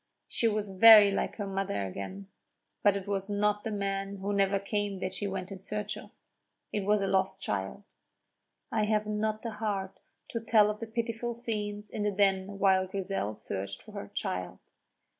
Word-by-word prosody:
She 230 - +1
was 210 -2 -1
very 210 +1 +9
like 195 - -1
her 205 - -3
mother 195 - -2
again; 100 - -6 0.5
but 205 -1 +4
it 195 0 -7
was 195 0 -2
not 205 0 +1
the - - -2
man 195 -1 -2
who 200 +1 -3
never 200 0 +3
came 200 0 -2
that 185 0 -3
she 195 +2 -2
went 190 -1 -4
in 190 -1 -7
search 210 +1 -3
of - - -10 0.6
it 210 - +1
was 210 0 +3
a 195 - 0
lost 190 0 +1
child. 100 - -3 0.9
I 215 -1 +2
have 215 0 +1
not 215 +1 -1
the 230 - -3
heart 205 -3 -3 0.3
to 230 - -2
tell 215 -2 +4
of 210 - -8
the 230 - -5
pitiful 230 +1 -3
scenes 210 -3 -4
in 215 - -4
the 210 - +2
Den 195 0 +1
while 190 -1 +3
Grizel 190 - -3
searched 100 0 -5
for - - -13
her - - -6
child. 90 0 -3
200 Hz, 185 wpm, -30 LUFS, 190-210 Hz, 0.9 s, very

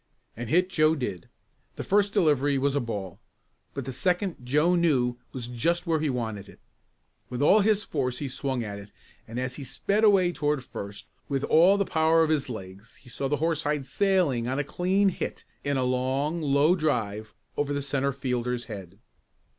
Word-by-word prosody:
And 120 0 -6
hit 180 +6 +3
Joe 155 -1 +3
did. 100 - -5 0.5
The - - -5
first 205 0 +2
delivery 145 -8 +2
was 140 +1 +1
a 145 - +1
ball, 100 -7 -5 0.6
but 135 -2 -4
the 130 - -5
second 180 +4 0
Joe 150 +8 +2
knew 135 -9 +2
was 125 -3 -5
just 165 +9 -1
where 165 -2 +1
he 155 -1 0
wanted 110 -6 -4
it. - - -16 0.7
With 125 - -4
all 170 +9 +5
his 210 0 +3
force 125 - -2
he 145 - -3
swung 130 -1 -2
at 100 -2 -6
it 100 +1 -12 0.4
and 115 +2 -5
as 130 0 -3
he 145 - -6
sped 200 - -1
away 195 -4 +5
toward 150 -5 -1
first, 100 -4 -8 0.2
with 135 -1 -1
all 180 +5 +5
the 200 - +1
power 160 0 +3
of 160 - +1
his 145 -4 0
legs 100 0 -9
he 130 - -16
saw 135 +3 -3
the 150 +2 0
horsehide 150 -3 -1
sailing 170 -8 +1
on 130 +2 -1
a 145 - +1
clean 190 +6 +1
hit - - -5 0.2
in 140 -1 0
a 130 - +1
long, 130 +6 0
low 145 +3 +3
drive 110 - -2 0.2
over 145 0 -1
the 145 0 -1
centre 140 0 0
fielder's 125 -2 -2
head. 100 -5 -9
140 Hz, 190 wpm, -27 LUFS, 125-165 Hz, 0.7 s, all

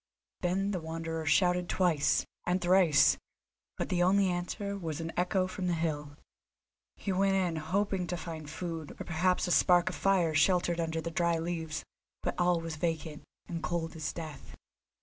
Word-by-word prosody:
Then 190 +3 0
the 185 - -1
Wanderer 165 0 -4
shouted 180 +2 +3
twice, 165 -6 +2 0.2
and 180 +1 +2
thrice, 175 -4 +5 0.6
but - - -2
the 175 -1 +1
only 190 +2 +4
answer 190 +3 -3
was 165 -5 -4
an 165 0 -4
echo 185 +1 +1
from 185 0 -4
the 175 - +1
hill. 150 -3 -3 0.8
He 200 - -3
went 195 +1 +2
in, 180 -4 +1
hoping 185 +3 -1
to 175 - -2
find 160 -3 -7
food, 165 -1 -5
or - - -3
perhaps 180 +3 +1
a - - -1
spark 175 0 +5
of - - -5
fire 185 -5 +2
sheltered 175 +2 +3
under 165 -1 -1
the 170 - -4
dry 170 0 +1
leaves. 160 -1 -3 0.4
But - - 0
all 175 -1 +3
was 165 -1 -5
vacant 160 -2 -2 0.3
and 170 -2 -4
cold 165 -2 -2
as 150 -3 -3
death. 160 -3 -8
170 Hz, 170 wpm, -31 LUFS, 160-180 Hz, 0.8 s, thrice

